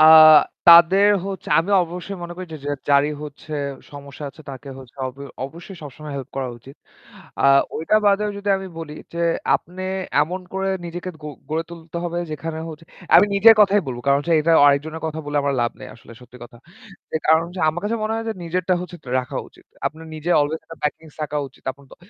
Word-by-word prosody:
আ - - +7 0.7
তাদের 175 +4 +8 0.2
হচ্ছে 195 -3 -6
আমি 170 +5 0
অবশ্যই 180 +3 -7
মনে 175 0 -6
করি 185 0 -7
যে - - -5
যে 145 - -2 0.2
যারই 140 +1 +4
হচ্ছে 150 +1 -10 0.4
সমস্যা 140 +1 -9
আছে 155 - -18
তাকে 135 +1 -10
হচ্ছে 130 -1 -14
অব 130 - -7 0.3
অবশ্যই 170 +7 -10
সবসময় 150 +1 -9
হেল্প 135 - -6
করা 135 -1 -2
উচিত। 135 +4 -15 0.6
আ - - +1 0.3
ওইটা 165 +7 +2
বাদেও 205 +1 +2
যদি 200 0 -5
আমি 190 0 -6
বলি 150 -2 -7 0.2
যে - - -5 0.4
আপনে 180 +2 -11 0.4
এমন 180 +5 -3
করে 190 0 -1 0.2
নিজেকে 175 +2 -6
গ - - -11 0.3
গড়ে 160 +1 0
তুলতে 165 -1 -10
হবে 175 0 -2
যেখানে 155 +1 -5
হচ্ছে 160 0 -10 0.3
আমি - - +7
নিজের 220 +3 +8
কথাই 205 0 +5
বলবো। 120 -2 -5
কারণ 140 0 +4
হচ্ছে 165 +3 +1
এটা 165 +2 +2
অ - - +6
আরেকজনের 155 +3 0
কথা 160 0 -4
বলে 145 0 -3
আমার 140 0 0
লাভ 120 - 0
নেই - - -8
আসলে 115 +1 -15
সত্যি 125 0 -15
কথা। 120 - -15 0.6
এ - - +4
কারণ 160 +1 +5
হচ্ছে 175 +1 -8
আমার 160 +2 -1
কাছে 225 +3 0
মনে 215 +1 -1
হয় 225 0 -3
যে - - 0
নিজেরটা 180 +2 0
হচ্ছে 180 0 -8
ত - - -22
রাখা 125 - -7
উচিত। - - -22 0.2
আপনার 160 +1 -6
নিজের 155 +3 0
অলওয়েজ 150 +2 -1
একটা 165 - -11
প্যাকিংস 155 +1 -4
থাকা 150 0 -3
উচিত। 130 - -25
আপনার 140 +1 -20
তো - - -13
160 Hz, 210 wpm, -21 LUFS, 145-180 Hz, 0.7 s, তাদের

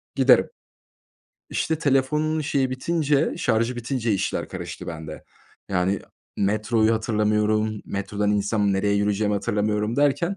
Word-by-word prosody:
giderim. - - +5 1.0
İşte, 160 -1 -1
telefonun 150 +2 +1
şeyi 135 -3 0
bitince 145 +1 0
şarjı 115 +1 0
bitince 120 -2 -1
işler 95 - -1
karıştı - - -7
bende. 80 -2 -7 0.5
Yani, 95 +1 +1 0.4
metroyu 110 +2 +2
hatırlamıyorum. 105 -1 0
Metrodan 100 +1 -2
insem, 105 0 +1
nereye 100 +1 +1
yürüyeceğimi 105 0 +1
hatırlamıyorum 105 +2 -1
derken 145 +7 +1
110 Hz, 110 wpm, -24 LUFS, 105-130 Hz, 1.0 s, giderim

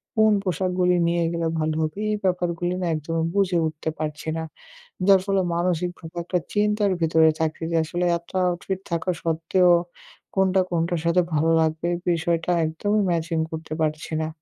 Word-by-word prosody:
কোন 220 -1 +5
পোশাকগুলি 180 0 +1
নিয়ে 170 0 +1
গেলে 170 -1 -1
ভালো 155 0 0
হবে। 155 +5 -3
এই - - +1
ব্যাপারগুলি 175 -1 0
না - - -1
একদমই 160 +2 -2
বুঝে 190 -3 +2
উঠতে 155 0 -4
পারছি 150 0 -4
না। 160 - -3 0.6
যার 195 -1 +7
ফলে 195 -1 +2
মানসিক 175 0 0
খুব 160 0 -10
একটা 180 +1 -1 0.2
চিন্তার 210 -1 +2
ভেতরে 160 -1 +4
থাকছি 160 0 -2
যে 165 - +2
আসলে 175 +2 -2
এত 170 - -18 0.2
আউটফিট 185 +2 -3
থাকা 170 +2 -1
সত্ত্বেও 165 +2 +2 0.6
কোনটা 190 0 +3
কোনটার 170 0 0
সাথে 170 +2 +4
ভালো 155 +2 +2
লাগবে 160 +1 0
এ - - -3
বিষয়টা 170 0 0 0.2
একদমই 205 +7 0
ম্যাচিং 165 0 -1
করতে 160 -1 -6
পারছি 155 +1 -2
না। - - -2
170 Hz, 165 wpm, -24 LUFS, 160-185 Hz, 0.6 s, যার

